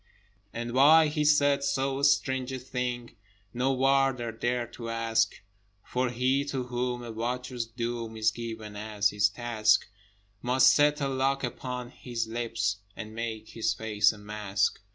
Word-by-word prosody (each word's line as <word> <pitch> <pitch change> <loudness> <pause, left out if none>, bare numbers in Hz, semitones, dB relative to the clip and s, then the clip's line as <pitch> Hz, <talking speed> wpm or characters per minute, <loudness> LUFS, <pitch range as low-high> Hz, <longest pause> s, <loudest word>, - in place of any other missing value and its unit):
But 120 +1 -4
why 150 +5 +6
he 150 0 -1
said 145 -2 +4
so 135 0 0
strange 130 -2 +2
a 130 - -3
thing 125 -1 -4 0.4
No 125 +3 +1
Warder 135 -2 +2
dared 120 +1 -2
to 115 -1 -6
ask: 115 -1 +1 0.5
For 125 0 -1
he 130 +3 +1
to 135 -3 -3
whom 125 0 -3
a 120 - -6
watcher's 120 +1 -3
doom 115 -1 -4
Is 110 0 +3
given 110 -2 -7
as 105 -1 0
his 105 0 +3
task, 110 -1 +2 0.6
Must 130 +1 +4
set 150 0 +3
a 140 - +1
lock 135 +1 0
upon 125 0 -4
his 120 -2 -4
lips, 115 -3 -2 0.2
And 110 -1 -8
make 110 -1 -5
his 115 - -1
face 105 -2 +2
a 110 - -12
mask. 105 -1 -1
120 Hz, 155 wpm, -28 LUFS, 110-130 Hz, 0.6 s, why